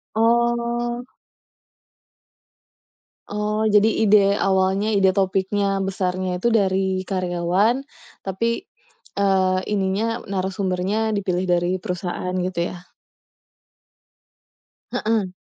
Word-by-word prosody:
Oh. 235 Hz, +1 st, +1 dB, 2.3 s
Oh, 210 Hz, +1 st, -1 dB
jadi 210 Hz, +1 st, +5 dB, 0.2 s
ide 210 Hz, 0 st, +6 dB, 0.2 s
awalnya, 195 Hz, +2 st, +1 dB
ide 195 Hz, -2 st, +4 dB
topiknya 195 Hz, +1 st, 0 dB
besarnya 185 Hz, -1 st, -2 dB
itu -, -, +3 dB
dari 190 Hz, -3 st, +1 dB
karyawan, 185 Hz, +3 st, +1 dB, 0.4 s
tapi, 230 Hz, -, -2 dB, 0.5 s
eee, 190 Hz, -2 st, +2 dB
ininya 195 Hz, +1 st, 0 dB, 0.3 s
narasumbernya 190 Hz, +1 st, -1 dB, 0.2 s
dipilih 185 Hz, -2 st, -1 dB
dari 175 Hz, 0 st, +2 dB
perusahaan 180 Hz, -1 st, -3 dB
gitu 185 Hz, -2 st, -3 dB
ya? 180 Hz, 0 st, -10 dB, 2.1 s
Heeh. 210 Hz, -4 st, -1 dB
195 Hz, 80 wpm, -22 LUFS, 185-215 Hz, 2.3 s, ide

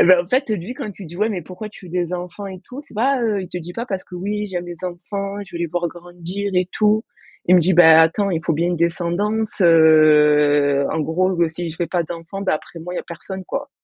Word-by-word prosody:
Eh -, -, +7 dB
bah, 185 Hz, 0 st, +7 dB
en 175 Hz, -, -15 dB
fait, 260 Hz, +1 st, +1 dB
lui 210 Hz, +3 st, -3 dB
quand 215 Hz, -, -5 dB
tu 200 Hz, 0 st, -11 dB
dis: 170 Hz, +1 st, -10 dB
«Ouais, 210 Hz, +4 st, +1 dB
mais 190 Hz, -4 st, -3 dB
pourquoi 185 Hz, +6 st, -8 dB
tu 200 Hz, -2 st, -14 dB
veux 170 Hz, -, -12 dB
des 180 Hz, -1 st, -1 dB
enfants 180 Hz, +3 st, -5 dB
et 190 Hz, -2 st, -8 dB
tout?» 255 Hz, +3 st, -9 dB
C'est 290 Hz, -, -18 dB
pas, 255 Hz, +4 st, +1 dB
heu, 215 Hz, -4 st, 0 dB
il 185 Hz, -, -8 dB
te 180 Hz, -, -7 dB
dit 175 Hz, +1 st, -8 dB
pas 235 Hz, +6 st, -5 dB
parce 195 Hz, -5 st, -3 dB
que: 180 Hz, -, -13 dB
«Oui 210 Hz, +3 st, -3 dB
j'aime 175 Hz, -2 st, -4 dB
les 175 Hz, 0 st, -7 dB
enfants, 195 Hz, +3 st, -5 dB
je 190 Hz, -, -18 dB
vais -, -, -5 dB
les 170 Hz, -, 0 dB
voir 175 Hz, +1 st, -2 dB
grandir 175 Hz, +3 st, -6 dB
et 180 Hz, 0 st, +1 dB
tout». 215 Hz, +1 st, +2 dB, 0.4 s
Il 180 Hz, -, +5 dB
me 180 Hz, -, +7 dB
dit: 180 Hz, +3 st, +2 dB
«Bah 160 Hz, -2 st, +8 dB
attends, 195 Hz, +5 st, +1 dB
il 165 Hz, -3 st, -1 dB
faut -, -, +1 dB
bien 165 Hz, +3 st, 0 dB
une 175 Hz, -, -1 dB
descendance, 180 Hz, +7 st, -1 dB
heu, 150 Hz, -3 st, +5 dB
en -, -, -1 dB
gros, 185 Hz, +5 st, 0 dB
ben 170 Hz, -1 st, +2 dB
si 170 Hz, +2 st, -5 dB
je 160 Hz, -, -7 dB
fais 175 Hz, -, -1 dB
pas 175 Hz, +1 st, 0 dB
d'enfants, 170 Hz, +4 st, -7 dB
bah 190 Hz, -, +1 dB
après 160 Hz, +2 st, -8 dB
moi 180 Hz, +2 st, -7 dB
il -, -, -5 dB
y -, -, -1 dB
a -, -, -11 dB
personne 190 Hz, +2 st, -8 dB
quoi». 280 Hz, +8 st, -5 dB
180 Hz, 280 wpm, -20 LUFS, 170-200 Hz, 0.4 s, Bah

